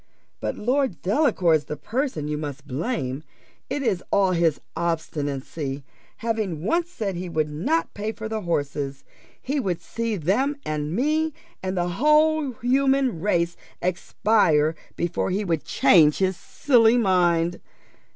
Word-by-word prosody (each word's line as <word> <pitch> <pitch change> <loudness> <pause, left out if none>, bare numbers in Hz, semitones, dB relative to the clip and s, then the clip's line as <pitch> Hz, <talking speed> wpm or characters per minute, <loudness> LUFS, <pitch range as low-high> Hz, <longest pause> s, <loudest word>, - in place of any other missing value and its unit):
But - - -2
Lord 250 - 0
Delacour's 185 - +2
the 150 - -5
person 250 - -2
you 150 - -1
must 145 -2 -6
blame 135 - -2 0.5
it 290 - -2
is 200 -8 0
all 195 -2 +3
his 165 -4 +2 0.2
obstinacy: 145 -4 -3 0.3
having 215 -9 -2
once 340 - +1
said 205 - -3
he 180 +1 -5
would 155 -2 -1
not 280 - 0
pay 210 +2 -3
for 220 0 -6
the 220 0 -3
horses, 145 -5 -2 0.4
he 280 +3 -2
would 185 -9 -1
see 230 -1 -3
them 205 - +1
and 155 +1 -2
me 310 +6 +1 0.3
and 185 0 -3
the 175 0 +1
whole 300 - +3
human 265 -4 +2
race 170 -3 +1 0.2
expire 175 -3 +2 0.2
before 175 +2 -1
he 200 +3 -1
would 165 -4 -1
change 155 -5 +5
his 190 -1 +1
silly 235 +2 +3
mind. 175 -5 +2
185 Hz, 140 wpm, -24 LUFS, 155-245 Hz, 0.5 s, change